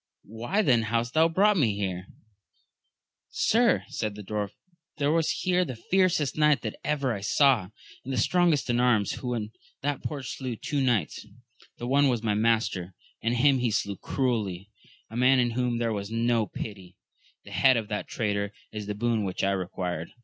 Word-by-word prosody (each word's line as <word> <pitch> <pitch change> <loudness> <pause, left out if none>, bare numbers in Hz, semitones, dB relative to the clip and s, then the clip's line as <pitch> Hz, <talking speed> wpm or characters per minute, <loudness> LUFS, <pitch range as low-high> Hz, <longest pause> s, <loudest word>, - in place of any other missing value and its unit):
— - - -37
^Why 120 - -1
then 120 -4 +4
hast 115 +2 -1
thou 160 +1 +4
brought 200 +4 +3
me 115 - +2
here? 95 -2 -3 1.2
Sir, 235 +2 +2
said 105 -2 -3
the 105 - -8
dwarf, 105 0 -3 0.5
there 145 -1 +1
was 165 -1 +2
here 180 0 +1
the 130 -8 -5
fiercest 170 -1 +1
knight 150 -1 +3
that - - -5
ever 140 -4 0
I 100 - -5
saw, 110 -2 +3 0.3
and 135 - -6
the 130 - -1
strongest 170 +4 +2
in 120 - +1
arms, 120 -5 +3
who 125 -1 -3
in 110 -2 -4 0.3
that 145 -1 -1
porch 140 -5 -5
slew 130 -3 -4
two 145 +5 -2
knights; 120 - 0 0.5
the 120 - -6
one 140 +3 +3
was 120 -3 0
my 105 -2 +1
master, 105 -5 0 0.3
and 115 +2 0
him 135 +2 +4
he 120 -1 +1
slew 100 -1 -1
cruelly, 105 -7 -2 0.4
as - - -16
a - - -4
man 130 +2 +5
in 120 -1 +2
whom 120 0 0
there 115 -1 0
was 100 -1 -4
no 115 -1 +1
pity: 95 -4 -8 0.5
the - - -13
head 130 -2 +4
of 110 -2 -2
that 105 -1 -3
traitor 100 -2 -2 0.2
is 105 -1 -6
the 105 - -3
boon 115 0 0
which 95 -2 -3
I 100 - +2
required. 90 -3 -3
115 Hz, 190 wpm, -27 LUFS, 105-140 Hz, 1.2 s, man